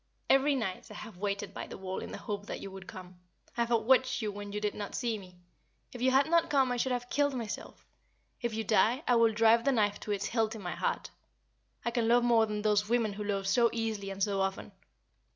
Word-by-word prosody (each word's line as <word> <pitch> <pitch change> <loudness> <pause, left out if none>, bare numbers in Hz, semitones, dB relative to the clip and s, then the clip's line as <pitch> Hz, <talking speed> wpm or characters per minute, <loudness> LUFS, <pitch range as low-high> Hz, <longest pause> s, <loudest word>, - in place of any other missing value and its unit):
Every 275 +1 +4
night 195 -8 -3
I - - -10
have 215 -4 -9
waited 200 +1 -3
by - - -6
the - - -8
wall 190 -1 -4
in - - -7
the - - -5
hope 205 -1 -5
that - - -5
you 195 - -8
would 190 0 -10
come. 180 -1 -10 0.4
I 235 - +2
have - - -11
watched 255 +3 +3
you 215 -3 -2
when 205 0 -7
you 210 - -3
did 210 -1 -1
not 205 -1 -6
see 230 -3 -1
me. 180 -2 -14 0.6
If 245 - -8
you 260 - +4
had 270 +2 +4
not 335 0 +3
come 270 -3 +3
I 245 - 0
should 260 +2 0
have 245 -1 -2
killed 285 -1 +2
myself; 230 -4 -6 0.6
if 235 - -1
you 225 - -1
die, 225 +6 +3
I 245 - +4
will 230 -1 +5
drive 225 +1 +4
the 275 - +3
knife 210 -5 +1
to 210 - -5
its 200 - -1
hilt 225 -1 0
in 220 - -8
my 175 - -3
heart. - - -2 0.7
I 235 - +1
can 230 -1 0
love 240 +1 +4
more 230 -2 +4
than 210 0 -3
those 210 0 +2
women 230 -3 +1
who 210 +1 -5
love 200 -1 -2
so 235 +4 +4
easily 220 -3 -2
and 195 0 -2
so 195 -1 +1
often. 190 0 -2
220 Hz, 245 wpm, -31 LUFS, 205-240 Hz, 0.7 s, will